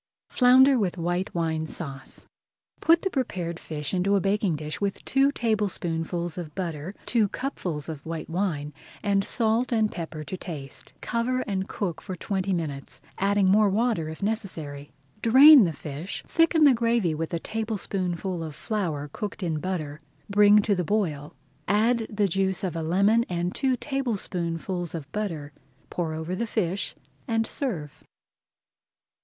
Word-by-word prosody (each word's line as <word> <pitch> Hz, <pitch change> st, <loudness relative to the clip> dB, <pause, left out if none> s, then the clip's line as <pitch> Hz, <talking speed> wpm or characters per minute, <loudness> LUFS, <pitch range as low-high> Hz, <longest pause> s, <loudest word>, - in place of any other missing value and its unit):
FLOUNDER 260 Hz, +1 st, +6 dB
WITH 190 Hz, -4 st, -1 dB
WHITE 175 Hz, +2 st, -2 dB
WINE 160 Hz, -2 st, -1 dB
SAUCE 140 Hz, -5 st, -7 dB, 0.5 s
Put 330 Hz, +1 st, +4 dB
the 385 Hz, -, 0 dB
prepared 180 Hz, -, -2 dB
fish 150 Hz, 0 st, -5 dB
into 190 Hz, +2 st, +2 dB
a -, -, +4 dB
baking 195 Hz, -2 st, +1 dB
dish 150 Hz, 0 st, -5 dB
[Page -, -, -31 dB
150] 200 Hz, -1 st, 0 dB
with -, -, -18 dB
two 270 Hz, +1 st, +3 dB
tablespoonfuls 175 Hz, -, -1 dB
of 155 Hz, -4 st, -7 dB
butter, 175 Hz, 0 st, -4 dB
two 225 Hz, -4 st, +2 dB
cupfuls 180 Hz, -, -4 dB
of 155 Hz, -3 st, -6 dB
white 165 Hz, 0 st, -5 dB
wine, 160 Hz, -5 st, -2 dB, 0.3 s
and 200 Hz, -1 st, +2 dB
salt 230 Hz, +3 st, +2 dB
and 220 Hz, -2 st, +2 dB
pepper 160 Hz, -3 st, -6 dB
to 185 Hz, -, -6 dB
season. 145 Hz, -6 st, -6 dB
Cover 245 Hz, +2 st, 0 dB
and 195 Hz, -4 st, -3 dB
cook 180 Hz, -6 st, -3 dB
for 185 Hz, -, -6 dB
twenty 195 Hz, +1 st, -2 dB
minutes, 150 Hz, -6 st, -4 dB, 0.2 s
adding 200 Hz, 0 st, +3 dB
more 205 Hz, +2 st, +5 dB
water 210 Hz, -6 st, +1 dB
if 160 Hz, +4 st, -7 dB
necessary. 160 Hz, -10 st, -3 dB, 0.3 s
Drain 265 Hz, +2 st, +9 dB
the 170 Hz, -, 0 dB
fish, 150 Hz, +4 st, -6 dB
thicken 330 Hz, -1 st, +3 dB
the 285 Hz, -3 st, +8 dB
gravy 230 Hz, -7 st, +1 dB
with 160 Hz, +1 st, -3 dB
a 170 Hz, -, -1 dB
tablespoonful 190 Hz, -4 st, -3 dB
of 155 Hz, -3 st, -7 dB
flour 160 Hz, -6 st, -2 dB
cooked 205 Hz, -1 st, -5 dB
in 160 Hz, -3 st, -1 dB
butter, 155 Hz, -5 st, -3 dB, 0.3 s
bring 205 Hz, +1 st, +6 dB
to 205 Hz, -, +2 dB
the 180 Hz, -2 st, 0 dB
boil, 160 Hz, -7 st, -1 dB, 0.3 s
add 225 Hz, +3 st, +2 dB
the 205 Hz, -1 st, +1 dB
juice 190 Hz, +1 st, 0 dB
of 180 Hz, -4 st, -2 dB
a 165 Hz, -, -2 dB
lemon 200 Hz, +8 st, +3 dB
and 175 Hz, 0 st, -1 dB
two 260 Hz, -2 st, +1 dB
tablespoonfuls 185 Hz, -, -2 dB
of 155 Hz, -4 st, -7 dB
butter, 165 Hz, -9 st, -4 dB, 0.4 s
pour 165 Hz, -3 st, -2 dB
over 160 Hz, +3 st, -4 dB
the 230 Hz, +5 st, -2 dB
fish, 200 Hz, -2 st, -1 dB, 0.3 s
and 225 Hz, -2 st, +1 dB
serve. 175 Hz, -, -4 dB
190 Hz, 160 wpm, -26 LUFS, 165-220 Hz, 0.5 s, Drain